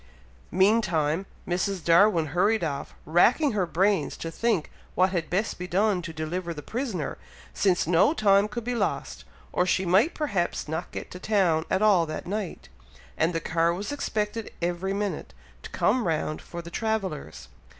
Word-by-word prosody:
Meantime, 185 -4 +2 0.2
Mrs. 180 0 -1
Darwin 170 0 +5
hurried 205 +3 +2
off, 140 -4 -4
racking 230 - +4
her 195 -5 0
brains 185 -3 +1
to 165 - -5
think 215 -3 0 0.2
what 185 +1 +3
had 170 -4 -2
best 195 +3 -1
be 180 - -4
done 195 +1 +2
to 170 -1 -6
deliver 165 +2 -4
the 150 - -8
prisoner, 225 - -3 0.3
since 185 -3 +2
no 175 - +4
time 205 -8 +4
could 220 +2 -5
be 245 +2 -2
lost, 235 - -2 0.3
or - - +3
she 185 +1 +1
might 195 - +3
perhaps 200 - -1
not 160 +3 -4
get - - -7
to 180 - -8
town 180 -6 +2
at 190 +2 +1
all 190 -6 +4
that 155 - -5
night, 200 -1 -4 0.5
and 160 +2 +1
the 165 - -1
car 165 +1 +1
was 200 +6 -4
expected 215 -5 -2
every 175 +2 -2
minute, 195 - -3 0.3
to - - -9
come 240 -2 +1
round 155 -1 -1
for 170 0 -8
the 170 - -10
travellers. 180 - -3
180 Hz, 170 wpm, -26 LUFS, 165-210 Hz, 0.5 s, Darwin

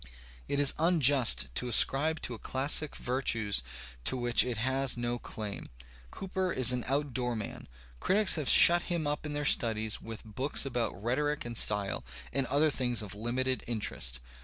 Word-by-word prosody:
It 140 - -2
is 145 -2 +4
unjust 140 - +3
to 125 - -3
ascribe 140 +6 +3
to 125 - -4
a 115 - -9
classic 145 +3 +1
virtues 115 - 0 0.4
to 130 - +2
which 120 -1 +4
it 125 -3 -4
has 130 +2 0
no 120 0 -3
claim. 105 -4 -7 0.4
Cooper 190 - -4
is 125 -4 +5
an 125 -1 -3
outdoor 130 -3 -2
man. 110 -2 -7 0.3
Critics 205 +1 +3
have 155 -5 -1
shut 175 0 +6
him 170 -3 -2
up 150 +1 -3
in 150 - -6
their 145 0 -3
studies 110 -5 0
with 115 -1 -10
books 130 +7 -1
about 120 -6 -3
rhetoric 145 +5 -2
and 120 0 -7
style 105 -3 0 0.3
and 135 -1 -2
other 145 +4 +1
things 125 -4 -1
of 105 - -8
limited 125 +4 -2
interest. 65 - -2
125 Hz, 165 wpm, -29 LUFS, 115-145 Hz, 0.4 s, shut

